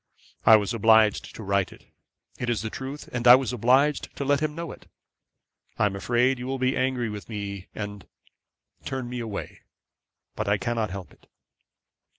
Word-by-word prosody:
I 110 - +10
was 105 +1 +1
obliged 110 -1 +3
to 110 - -8
write 100 -1 0
it. - - -16 0.5
It 120 - -2
is 115 -2 0
the 110 - -4
truth, 135 +3 -7
and 125 0 0
I 120 - +11
was 130 -2 -1
obliged 130 +5 +2
to 140 - -4
let 140 +1 +3
him 150 0 -2
know 170 0 -5
it. - - -13 0.9
I - - +3
am 100 -1 0
afraid 120 +5 +1
you 125 - -5
will 135 0 -2
be 130 0 +1
angry 130 -2 0
with 105 +1 -8
me, 100 -3 -5
and 105 -2 -6 0.8
turn 130 -2 -4
me 125 0 -5
away; 110 -4 -6 0.8
but - - -3
I 100 +1 +3
cannot 115 -1 -1
help 95 -1 -8
it.' - - -25
120 Hz, 180 wpm, -26 LUFS, 105-130 Hz, 0.9 s, I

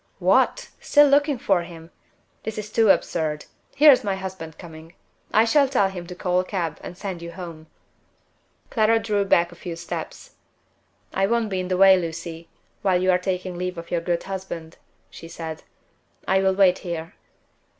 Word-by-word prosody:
"What! - - +2
still 290 -1 +5
looking 285 0 +3
for 195 -6 +1
him? 170 -1 -11 0.5
This 220 -1 -6
is 210 0 -7
really 225 -2 +4
too - - +10
absurd. 155 -2 -3 0.3
Here 295 +1 +8
is 255 - +3
my 200 -2 -1
husband 185 -4 -7
coming. 165 -1 -12 0.4
I 220 +1 +4
shall 280 +3 +3
tell 205 -8 +2
him 180 -3 -8
to 180 - -8
call 180 0 0
a - - +1
cab, 175 -5 -3
and 175 - -9
send 190 -3 -5
you 170 0 -7
home." 165 -3 -9 1.0
Clara 225 -1 +3
drew 210 -2 0
back 175 -2 +3
a - - -13
few 170 0 -7
steps. 170 - -7 0.8
"I 195 - +1
won't 230 -1 0
be 190 - -1
in 185 - -3
the 185 0 -1
way, 190 0 +7
Lucy, 165 0 -6 0.3
while 185 -3 +2
you 185 +1 +3
are 180 - +3
taking 180 -1 -3
leave 180 0 -3
of 170 0 -9
your 170 - 0
good 170 0 -1
husband," 185 -4 -7 0.3
she 165 - -11
said. 160 -1 -7 0.7
"I 190 0 +3
will 190 0 +2
wait 190 -2 +4
here." 170 -2 -6
185 Hz, 185 wpm, -23 LUFS, 170-200 Hz, 1.0 s, too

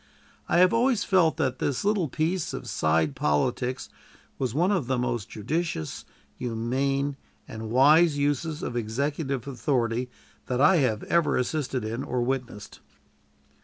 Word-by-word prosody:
I - - +3
have 180 +1 +5
always 235 -1 +2
felt 180 -5 +3
that 130 - -1
this 140 +5 -1
little 205 -5 +2
piece 160 +5 -1
of - - -6
side 80 -2 +1
politics 125 - 0 0.5
was 130 -3 -1
one 170 - +2
of 180 -11 0
the 130 0 0
most 120 -3 -2
judicious, 120 - -3 0.3
humane, 135 +4 -1 0.3
and 110 0 -7
wise 145 +6 +5
uses 145 +3 -1
of 120 - -4
executive 135 +3 -2
authority 125 -2 -1 0.4
that 125 -1 -1
I 155 +6 +6
have 120 -8 +1
ever 170 -2 +2
assisted 130 -2 -2
in 115 +4 -3
or 125 -3 -1
witnessed. 125 -5 -4
135 Hz, 140 wpm, -26 LUFS, 120-155 Hz, 0.5 s, I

